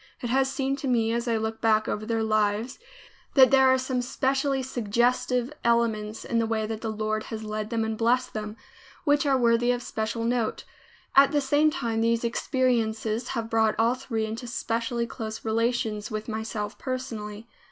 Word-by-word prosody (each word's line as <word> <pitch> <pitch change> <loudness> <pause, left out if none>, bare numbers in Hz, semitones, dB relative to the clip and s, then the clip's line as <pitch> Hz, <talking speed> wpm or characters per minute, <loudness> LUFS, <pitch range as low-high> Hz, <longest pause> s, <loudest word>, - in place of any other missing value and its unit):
It 240 -2 -3
has 270 +1 +2
seemed 275 0 -1
to 275 - -3
me, 230 -3 +2
as 235 +1 -2
I 230 -1 +2
look 220 0 -3
back 220 -1 +3
over 215 +1 -3
their 225 -1 0
lives, 215 +2 0 0.6
that 265 -2 +7
there 265 -1 +6
are 260 0 +5
some 255 -1 -1
specially 270 +2 0
suggestive 250 +2 0
elements 225 -2 0
in 230 - 0
the 225 - +1
way 220 -1 0
the 220 +1 -4
Lord 215 0 -2
has 220 -1 -6
led 215 0 -4
them 230 -1 0
and 220 0 -2
blessed 245 +2 +2
them, 215 0 -5 0.5
which 290 -1 +2
are 270 -1 +4
worthy 235 0 +3
of 245 0 -2
special 220 +1 -3
note. 235 -1 -1 0.5
At 275 0 +7
the 295 - +2
same 290 +2 +3
time 235 -8 -2
these 230 0 +1
experiences 235 -2 0
have 225 -1 -2
brought 225 -1 +2
all 230 +2 +3
three 245 -4 -3
into 225 +3 -6
specially 235 0 -2
close 220 -2 -6
relations 225 -1 0
with 215 0 -4
myself 220 -2 -4
personally. 225 -4 -5
230 Hz, 180 wpm, -26 LUFS, 220-255 Hz, 0.6 s, that